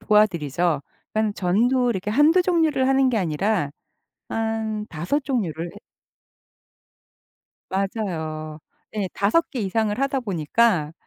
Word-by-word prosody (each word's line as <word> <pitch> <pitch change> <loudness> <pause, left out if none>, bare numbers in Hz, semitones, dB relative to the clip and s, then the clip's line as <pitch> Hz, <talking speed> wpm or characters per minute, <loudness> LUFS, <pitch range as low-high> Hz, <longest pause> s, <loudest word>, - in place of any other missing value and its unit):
도와드리죠. 170 -7 +2 0.3
그러니까 215 -1 +1
전도 240 +8 +2
이렇게 200 -2 -2
1-2 300 - +5
종류를 320 -7 +2
하는 270 0 +4
게 245 - 0
아니라 180 -1 0 0.6
한 220 -1 -2
5 180 - -2
종류를 180 - -2
해 - - -10 1.9
맞아요. 160 -6 -3 0.3
네. 205 -3 -2
5 215 +12 +2
개 255 - -3
이상을 210 +1 0
하다 275 0 0
보니까 180 -4 +1
210 Hz, 220 characters per minute, -23 LUFS, 175-245 Hz, 1.9 s, 1-2